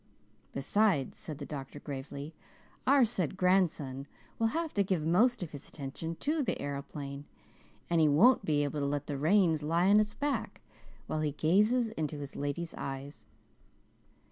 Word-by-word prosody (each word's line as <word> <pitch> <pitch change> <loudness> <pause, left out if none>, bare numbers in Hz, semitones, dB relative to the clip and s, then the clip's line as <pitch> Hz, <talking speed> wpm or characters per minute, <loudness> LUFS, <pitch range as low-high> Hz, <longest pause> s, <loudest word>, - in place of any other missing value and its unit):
"Besides," 160 0 +1
said 155 - -7
the 145 - -6
doctor 140 -1 -7
gravely, 140 +2 -7 0.5
"our 270 -1 +6
said 190 -6 -1
grandson 165 -8 +1 0.3
will 225 - +3
have 320 +6 -2
to 200 - +2
give 180 -5 -1
most 215 +7 +3
of 165 - -7
his 145 - -9
attention 160 +3 -6
to 305 +2 +1
the 260 - -1
aeroplane 140 0 -5 0.6
he 165 -2 +4
won't 205 - +5
be 145 -2 +1
able 145 +1 -2
to 140 - 0
let 145 0 -2
the 145 - -3
reins 160 +1 +3
lie 165 +5 +2
on 210 - +7
its 210 0 0
back 290 0 -2 0.4
while 155 - -2
he 150 -2 -1
gazes 210 - +3
into 155 -8 -3
his 140 -1 -7
lady's 145 +4 -3
eyes. 135 +1 -6
155 Hz, 160 wpm, -31 LUFS, 145-205 Hz, 0.6 s, on